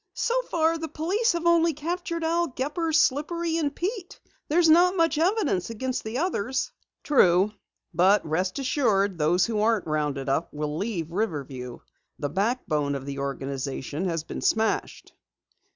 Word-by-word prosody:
"So 475 - 0 0.2
far 330 0 +1
the 320 - -4
police 360 +9 0
have 340 0 -3
only 335 -1 +4
captured 335 +2 -3
Al 340 +1 +1
Gepper, 295 +5 -2
Slippery 325 +3 +1
and 295 -4 -1
Pete. 380 0 -4 0.3
There's 335 +2 +3
not 350 +4 +5
much 330 -3 +2
evidence 330 - +1
against 255 +3 -3
the 220 +3 -4
others." 265 - -1 0.3
"True, 190 -7 +4 0.4
but 190 +4 +4
rest 180 +4 -1
assured 215 - +1
those 175 +4 +3
who 220 -2 -1
aren't 220 -1 +2
rounded 150 -3 -2
up 140 +5 0
will 150 0 -3
leave 175 -3 -3
Riverview. 140 - -4 0.4
The 145 - -3
backbone 170 - 0
of 135 -1 -6
the 140 0 -5
organization 140 +3 -4
has 165 -3 -1
been - - -6
smashed." 220 0 0
225 Hz, 150 wpm, -26 LUFS, -, 0.4 s, not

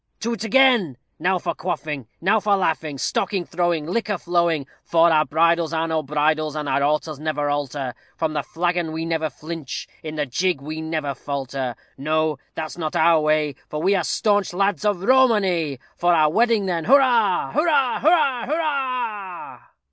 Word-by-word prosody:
To 235 +1 -1
't 215 - -7
again! 235 - +4 0.2
Now 185 +3 +1
for - - -3
quaffing, 150 -7 -4
Now 205 +5 +3
for 205 -1 +2
laughing, 160 -6 -1
Stocking 185 +6 -1
throwing, 170 -3 -1
Liquor 210 +4 -1
flowing; 170 -4 0 0.2
For 170 0 +4
our 155 -1 +4
bridals 165 +1 +2
are 160 0 0
no 160 -1 0
bridles, 155 +1 0
and 150 -1 -3
our 135 +1 +1
altars 150 +1 0
never 150 -2 -1
alter; 140 -3 -3 0.2
From 160 -2 -1
the 150 - 0
flagon 170 +1 -2
never 160 -1 -1
flinch 155 +1 -7
we, 155 - -6
in 155 - -7
the 150 -1 -1
jig 175 +5 0
we 155 +3 -6
never 155 -3 -2
falter. 135 -2 -4 0.2
No! 155 0 0 0.2
that's 160 +2 -5
not 155 -2 -3
our 165 0 +5
way, 155 -1 +1 0.2
for 150 - -4
we 190 +5 +2
Are 185 -3 +1
staunch 205 +1 +1
lads 200 +3 0
of 200 -3 0
Romany. 195 - +3 0.2
For 175 0 +3
our 155 -2 +4
wedding, 225 +1 +2
then, 170 -4 -2
hurrah! 250 -4 +3
Hurrah! 295 -4 +2
hurrah! 280 -7 +3
hurrah! 255 - -3
165 Hz, 170 wpm, -22 LUFS, 155-200 Hz, 0.2 s, our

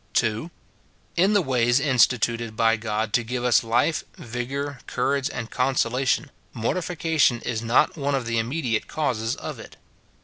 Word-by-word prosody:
2. 115 +7 +1 0.7
In 190 +4 +3
the 205 -3 +3
ways 125 -2 +2
instituted 120 -4 +2
by 115 0 +3
God, 110 -1 -2
to 120 - +3
give 120 +2 -3
us 125 -1 +4
life, 120 +8 +1
vigour, 130 +4 -4
courage, 135 +2 0
and 115 -3 -6
consolation, 130 +2 +1 0.2
mortification 160 0 +1
is 115 -3 -3
not 115 +1 +2
one 140 -2 -1
of 130 -3 -2
the 115 0 0
immediate 120 -1 -1
causes 120 -7 -1
of - - -7
it. - - -12
125 Hz, 145 wpm, -24 LUFS, 115-140 Hz, 0.7 s, us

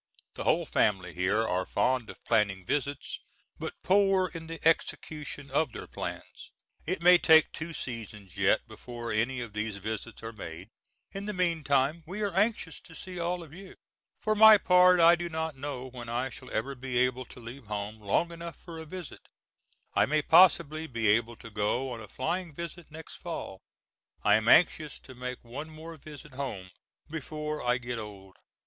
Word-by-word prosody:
The - - -6
whole - - +3
family 95 -4 +1
here 95 +5 +1
are 90 +1 0
fond 125 +3 0
of - - -11
planning 100 -5 +1
visits, 140 +4 -2 0.4
but - - -6
poor 195 -1 +4
in 165 -1 -7
the 165 -1 -6
execution 150 -3 -1
of 145 -1 +1
their - - -7
plans. - - -7 0.4
It 175 0 -2
may 180 0 +8
take 160 -1 +6
two 165 +1 -6
seasons 110 - -7
yet 100 +3 +2
before 115 +1 -7
any 120 +4 0
of 115 -3 -7
these 105 -1 -3
visits 110 +3 -5
are 115 +1 -6
made; 90 -1 -8 0.4
in 195 +1 -6
the 210 - -2
meantime, 160 -4 +1
we 205 +4 -4
are 200 -3 -1
anxious 195 -5 0
to 160 - -14
see 180 +1 -7
all 175 +1 -1
of 155 -2 -14
you. 190 +2 -11 0.4
For 215 - +1
my 215 0 +9
part 180 -1 +6
I 170 +1 +8
do 175 0 -4
not 160 -2 -3
know 135 -2 -5
when 120 -2 -8
I 125 +2 -1
shall - - -10
ever 130 +6 -2
be 130 -1 -4
able 125 0 +1
to 125 - -13
leave 120 +1 -10
home 105 +1 -4
long 110 +12 +1
enough 170 0 -7
for 165 -2 -10
a 160 - -8
visit. 180 -1 -9 0.7
I - - +3
may 150 +2 +1
possibly 160 -2 +5
be 115 -5 0
able 115 +2 +2
to 115 - -12
go 110 +5 0
on 115 -2 -6
a 105 - -9
flying 165 - -3
visit 170 +1 -7
next 160 +1 -10
fall. 160 - -6 0.6
I 105 - +5
am 110 +1 +3
anxious 155 0 +4
to 130 - -12
make 125 0 -6
one 140 +7 -7
more 160 +1 -9
visit 150 -1 -12
home 115 -9 -5 0.4
before 150 0 -4
I 125 0 +2
get 120 -2 -5
old. 100 -3 -9
135 Hz, 185 wpm, -29 LUFS, 115-165 Hz, 0.7 s, my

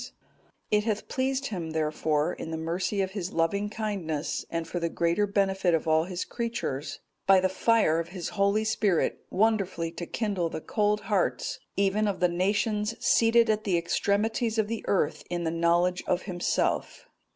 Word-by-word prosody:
It 210 0 +3
hath 215 -1 -2
pleased 265 +1 -1
Him, 165 -4 -4
therefore, 155 +1 0
in - - -7
the 160 - -3
mercy 180 +5 -1
of 190 - -4
His 190 -3 -4
loving 200 +5 0
kindness, 195 -9 -3
and 165 -1 -3
for 175 - -3
the 170 0 -1
greater 170 +5 +1
benefit 195 -3 +2
of 165 - -2
all 160 +1 +3
His 180 -1 -4
creatures,(220) 230 - -5
by 195 -1 +7
the 185 - +2
fire 190 -4 +3
of 165 - -3
His 180 0 -5
Holy 200 +1 +1
Spirit 215 -5 +1
wonderfully 195 -5 +1
to 170 0 -6
kindle 200 -7 -1
the 160 - -5
cold 210 +4 0
hearts 205 -4 -1 0.2
even 200 +2 +2
of 200 - -2
the 180 - +3
nations 210 +4 0
seated 230 0 +4
at 215 -1 +1
the 185 -4 +1
extremities 220 +7 0
of 215 -2 +2
the 230 0 -4
earth 190 -7 +1
in 175 0 -2
the 160 - 0
knowledge 170 +2 +2
of 175 - +1
Himself. 175 -3 -1
190 Hz, 175 wpm, -28 LUFS, 170-210 Hz, 0.2 s, by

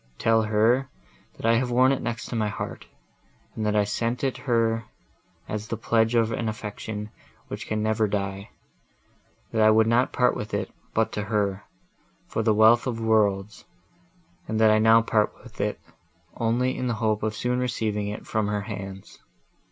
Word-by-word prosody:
Tell 115 0 +3
her, 110 +5 +2 0.5
that - - -7
I 115 0 +4
have 125 +1 0
worn 130 +2 +4
it 135 - -1
next 120 +1 -4
my 110 -2 0
heart, 105 - -6 0.7
and 110 - -3
that 105 - +1
I 105 - +4
sent 115 +5 -2
it 135 -2 0
her 115 -1 +2 0.6
as 105 0 -4
the 115 - -3
pledge 115 +1 +1
of 115 -1 +3
an 115 0 -1
affection, 105 0 -6 0.4
which - - -6
can 110 0 -1
never 110 0 +1
die; 100 0 -3 1.0
that 110 - +1
I 110 - +7
would 110 +1 +5
not 120 +3 +2
part 125 - +2
with 105 - -4
it, - - -3 0.2
but 110 0 +2
to 105 - -3
her, 100 -2 -1 0.6
for - - -2
the 110 0 +2
wealth 110 +4 +5
of 115 -2 -2
worlds, 105 -2 +1 0.8
and 110 0 -1
that 110 -1 +6
I 110 - +4
now 110 +1 +6
part 110 -2 +1
with - - -8
it, - - -1 0.6
only 120 +3 0
in 125 - -2
the 120 - 0
hope 110 -1 0
of 110 0 -2
soon 125 +3 -1
receiving 110 -4 -1
it 105 +1 -6
from 110 -1 -1
her 105 0 -1
hands. 100 -2 -8
110 Hz, 180 wpm, -25 LUFS, 105-115 Hz, 1.0 s, I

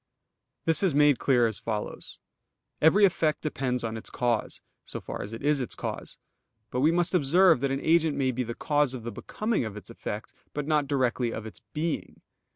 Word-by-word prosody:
This 165 -1 +4
is 185 -7 +2
made 145 -3 +5
clear 125 -3 +3
as 110 -3 -1
follows: 105 -2 -4 0.6
Every 195 +7 +6
effect 160 -4 +1
depends 130 -5 -1
on 115 -1 -3
its 110 - -8
cause, 120 -3 -1 0.2
so - - -6
far - - -6
as 100 - -6
it 115 - -7
is 145 0 +3
its 125 - -3
cause. - - -5 0.5
But 125 - -1
we 150 +5 +4
must 175 +1 +1
observe 175 0 +5
that 140 +2 0
an 135 +1 -1
agent 160 -2 +3
may 130 -2 +2
be 130 +1 -2
the 120 -1 -4
cause 145 -3 +1
of 120 - -7
the 120 - -4
becoming 215 - -2
of 110 -2 -5
its 105 - -10
effect, 105 -1 -6 0.2
but 150 -1 -2
not 150 -2 +1
directly 125 -3 +1
of 110 - -5
its 110 - -10
_being. 160 +1 -2
135 Hz, 200 wpm, -27 LUFS, 120-155 Hz, 0.6 s, Every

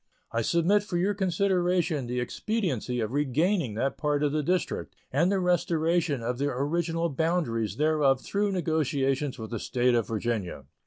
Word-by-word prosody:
I 115 - 0
submit 170 - +3
for 200 -4 -3
your 195 +4 +1
consideration 180 - +1
the 125 +1 -2
expediency 130 - -2
of 110 +2 -3
regaining 145 - +1
that 135 +4 -1
part 150 -1 +1
of 145 - +2
the 155 +1 0
District 180 +5 -1 0.2
and 165 +8 +2
the 200 - +2
restoration 170 -5 +1
of 125 +2 -2
the 140 - +1
original 165 +5 -1
boundaries 145 - 0
thereof 150 -3 +3
through 205 +6 -1
negotiations 145 -5 0
with 110 0 -7
the 115 - -3
State 125 +2 +1
of 115 -2 +1
Virginia. 105 - -3
150 Hz, 160 wpm, -27 LUFS, 125-175 Hz, 0.2 s, submit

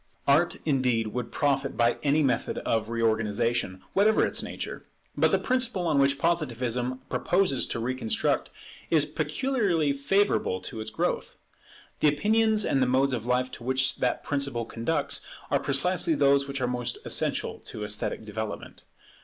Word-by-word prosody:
Art, 155 +5 +4
indeed, 125 -7 +1
would 125 +2 -4
profit 140 -1 0
by 120 0 +2
any 150 +2 +2
method 125 -4 0
of 110 -1 0
reorganization, 110 -3 0
whatever 215 +2 +4
its - - +1
nature. - - -6 0.3
But - - +3
the - - +3
principle 250 -8 0
on 155 -4 +2
which 140 0 +3
Positivism 130 -6 -1
proposes 180 -8 +1
to - - -3
reconstruct 125 -1 -1 0.4
is 155 -3 +4
peculiarly 160 - 0
favourable 140 - +1
to 110 - -7
its 110 - -5
growth. 110 - -2 0.6
The - - +4
opinions 215 +7 +2
and 135 - +1
the 130 - +3
modes 130 +2 +2
of 120 -1 -3
life 125 +1 +1
to - - -9
which 130 +1 0
that 125 - -1
principle 140 -5 -1
conducts 140 +6 -1 0.3
are - - +3
precisely 165 +4 +2
those 140 -1 +3
which 140 -1 -4
are 125 - +1
most 125 -1 -3
essential - - -1
to 105 - -7
esthetic 105 +1 -2
development. 110 0 -6
135 Hz, 155 wpm, -27 LUFS, 120-155 Hz, 0.6 s, Art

